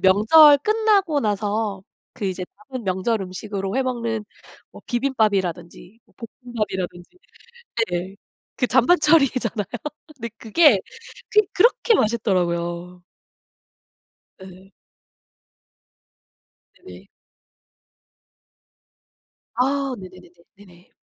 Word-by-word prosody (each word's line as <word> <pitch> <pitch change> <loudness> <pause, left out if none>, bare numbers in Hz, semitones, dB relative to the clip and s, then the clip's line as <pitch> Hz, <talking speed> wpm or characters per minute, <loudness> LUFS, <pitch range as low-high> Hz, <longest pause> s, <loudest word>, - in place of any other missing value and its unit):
명절 255 +11 +6
끝나고 410 -4 +1
나서 210 -2 -2 0.3
그 245 - -7
이제 185 -1 -3 0.3
남은 255 -3 -6
명절 190 +4 -1
음식으로 195 +2 -5
해 265 - +2
먹는 235 -4 -3 0.5
뭐 - - -14
비빔밥이라든지 205 -7 -2 0.4
볶음밥이라든지 205 - -5 0.7
네네. 180 +2 -4 0.4
그 - - 0
잔반 260 +9 +4
처리잖아요. 260 -9 +2 0.5
근데 235 -3 -6
그게, 235 - +4 0.5
그게 425 -1 +3
그렇게 475 +3 +3
맛있더라고요. 180 - -1 1.4
네. 190 +1 -15 2.1
네네. 90 +2 -13 2.5
아. 270 +2 0
네네네네. 185 -2 -13 0.3
네네. 180 -3 -19
215 Hz, 205 characters per minute, -22 LUFS, 185-260 Hz, 2.5 s, 명절